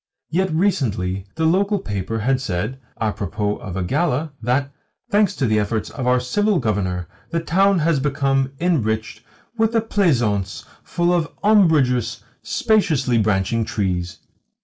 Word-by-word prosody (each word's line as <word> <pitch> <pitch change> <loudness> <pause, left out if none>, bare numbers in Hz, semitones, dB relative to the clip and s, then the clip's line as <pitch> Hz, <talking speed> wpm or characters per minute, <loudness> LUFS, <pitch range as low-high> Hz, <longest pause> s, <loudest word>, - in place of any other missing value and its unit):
Yet 185 +2 +1
recently 110 - 0
the 160 - 0
local 200 +5 +2
paper 105 - -3
had 130 +3 +1
said 110 +2 -3 0.2
(apropos 105 -1 -2
of 95 -2 -7
a 95 - -1
gala) 150 - 0
that, 130 +4 0 0.4
"Thanks 205 -2 +3
to 135 - 0
the 110 -2 +2
efforts 105 +1 -2
of 130 -3 -4
our 125 0 +4
Civil 205 +11 +1
Governor, 95 - -1 0.2
the 165 - 0
town 190 +4 +3
has 165 -2 +2
become 135 -1 0
enriched 110 -11 -1 0.4
with 225 +1 +2
a 225 - +4
pleasaunce 120 - 0 0.2
full 175 0 0
of 165 -2 0
umbrageous, 160 - +3 0.2
spaciously 145 - +1
branching 105 +2 +1
trees. 90 -5 -2
130 Hz, 140 wpm, -21 LUFS, 105-170 Hz, 0.4 s, our